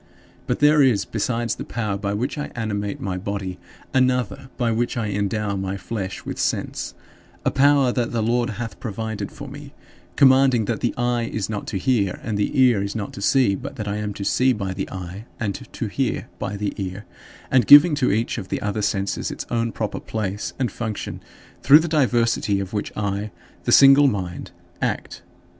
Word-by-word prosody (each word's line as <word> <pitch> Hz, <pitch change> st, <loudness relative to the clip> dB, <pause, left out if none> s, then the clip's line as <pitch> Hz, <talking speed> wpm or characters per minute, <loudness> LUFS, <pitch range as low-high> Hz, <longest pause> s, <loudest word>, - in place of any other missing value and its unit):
But -, -, -1 dB
there 150 Hz, 0 st, +6 dB
is, 125 Hz, -7 st, +3 dB
besides 115 Hz, +1 st, -1 dB
the -, -, -6 dB
power 105 Hz, -4 st, -3 dB
by 100 Hz, 0 st, -2 dB
which 125 Hz, +7 st, -2 dB
I 150 Hz, -1 st, -4 dB
animate 105 Hz, -3 st, -3 dB
my 95 Hz, -1 st, -3 dB
body, 95 Hz, -2 st, -4 dB, 0.3 s
another 130 Hz, -1 st, +1 dB
by 120 Hz, -2 st, +1 dB
which 120 Hz, +2 st, -1 dB
I 110 Hz, -2 st, -1 dB
endow 100 Hz, +1 st, -1 dB
my 95 Hz, 0 st, -3 dB
flesh 100 Hz, -2 st, -5 dB
with -, -, -5 dB
sense -, -, -2 dB, 0.5 s
a -, -, +3 dB
power 140 Hz, -2 st, +4 dB
that 120 Hz, -1 st, -1 dB
the 115 Hz, -2 st, 0 dB
Lord 120 Hz, +2 st, +1 dB
hath 115 Hz, -4 st, -6 dB
provided 110 Hz, 0 st, -4 dB
for 140 Hz, -, -9 dB
me; 140 Hz, +1 st, -10 dB, 0.4 s
commanding 130 Hz, -3 st, +5 dB
that 115 Hz, 0 st, -2 dB
the 120 Hz, -, -1 dB
eye 120 Hz, -1 st, 0 dB
is 110 Hz, -1 st, -3 dB
not 105 Hz, -, -4 dB
to -, -, -2 dB
hear 100 Hz, -3 st, +1 dB
and 110 Hz, -, -2 dB
the 105 Hz, +7 st, 0 dB
ear 125 Hz, -6 st, +5 dB
is 100 Hz, +2 st, -3 dB
not 105 Hz, -3 st, -4 dB
to -, -, -8 dB
see, 125 Hz, -1 st, +3 dB
but -, -, -6 dB
that 105 Hz, -, -5 dB
I 100 Hz, +1 st, -2 dB
am 105 Hz, -1 st, -3 dB
to 100 Hz, -, -5 dB
see 130 Hz, +4 st, +3 dB
by 100 Hz, -4 st, -3 dB
the 95 Hz, 0 st, -4 dB
eye 95 Hz, +3 st, -7 dB
and 105 Hz, -4 st, -1 dB
to -, -, -6 dB
hear -, -, -2 dB
by 100 Hz, -, -3 dB
the 100 Hz, 0 st, -2 dB
ear; 95 Hz, +1 st, -5 dB, 0.5 s
and 125 Hz, -5 st, +4 dB
giving 150 Hz, +3 st, +9 dB
to 125 Hz, -, +3 dB
each 110 Hz, +3 st, 0 dB
of 95 Hz, -, -7 dB
the -, -, -1 dB
other 105 Hz, +1 st, -2 dB
senses 100 Hz, -1 st, -1 dB
its -, -, -6 dB
own 115 Hz, -1 st, 0 dB
proper 110 Hz, -2 st, -3 dB
place 105 Hz, -2 st, -4 dB
and 125 Hz, -5 st, -1 dB
function, 110 Hz, -1 st, -5 dB, 0.4 s
through 140 Hz, +2 st, +8 dB
the 160 Hz, +2 st, 0 dB
diversity 120 Hz, -8 st, +2 dB
of 95 Hz, +1 st, -5 dB
which 105 Hz, -, -2 dB
I, 100 Hz, 0 st, -2 dB, 0.4 s
the -, -, +1 dB
single 140 Hz, +1 st, +8 dB
mind, 95 Hz, -7 st, -3 dB, 0.3 s
act. -, -, -3 dB
110 Hz, 195 wpm, -22 LUFS, 100-125 Hz, 0.5 s, giving